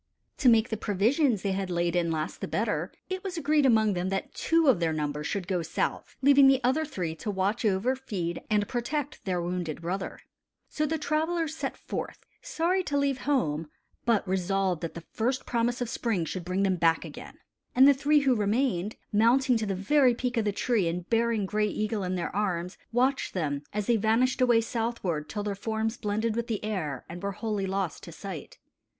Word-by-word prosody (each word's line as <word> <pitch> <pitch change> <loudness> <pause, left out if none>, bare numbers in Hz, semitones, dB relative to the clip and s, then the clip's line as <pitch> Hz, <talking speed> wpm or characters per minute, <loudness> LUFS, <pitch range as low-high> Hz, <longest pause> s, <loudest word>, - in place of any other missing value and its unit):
To 260 - +5
make 230 0 +4
the 220 - -2
provisions 220 - +1
they 200 - 0
had 190 0 -2
laid 175 0 0
in 170 -1 +1
last 160 -1 -3
the - - -2
better, - - -1 0.2
it 375 +1 -4
was 375 -3 -4
agreed 295 -2 +3
among 220 -4 +4
them 180 +1 -1
that 195 0 -3
two 330 -1 +2
of 250 -10 +5
their 165 -2 +1
number 150 -1 -2
should 185 +2 -3
go 180 -2 0
south, 160 - -3
leaving 280 0 +7
the 270 -1 +5
other 270 +6 +2
three 180 - -3
to 210 - -5
watch 200 +3 0
over, 215 +5 +2
feed, 190 -10 -4
and 210 -1 +2
protect 280 +4 -3
their 185 -2 0
wounded 175 -3 -3
brother. 185 +3 -3 0.5
So 305 0 -1
the 320 +2 0
travelers 315 +1 -1
set - - -4
forth, - - -6 0.2
sorry 370 -5 0
to 285 - 0
leave 280 -2 +1
home, 160 - 0 0.3
but 230 -4 +2
resolved 190 -1 0
that 165 - -5
the 170 - -7
first 250 +4 -1
promise 240 +1 0
of 245 - 0
spring 220 -6 -1
should 180 +2 -4
bring 185 +2 0
them 190 -2 +2
back 165 -1 +2
again. - - -10 0.4
And 260 +2 +8
the 285 - +8
three 290 +2 +3
who 270 -2 +3
remained, 210 -2 0 0.2
mounting 245 +5 +4
to 220 -1 -2
the 195 - -1
very 250 +6 +3
peak 245 +1 -2
of 225 -2 +1
the 205 - +2
tree 205 -2 +1
and 175 +2 -3
bearing 230 -2 +2
Gray 210 +2 +1
Eagle 215 0 -2
in 185 0 -1
their 175 0 -3
arms, 180 -3 -1 0.2
watched 255 +1 +1
them, 145 -5 -1
as 210 0 -2
they 235 0 +3
vanished 225 +5 +2
away 240 -2 +5
southward, 225 -9 -2
till 205 -1 -3
their 205 -1 -2
forms 220 +2 -2
blended 215 0 -1
with 235 0 -2
the 215 -2 -3
air 160 - -3
and 175 +1 -8
were 200 0 -2
wholly 210 -2 -2
lost 190 -3 -2
to 170 - -9
sight. 175 -1 -8
215 Hz, 205 wpm, -28 LUFS, 185-255 Hz, 0.5 s, And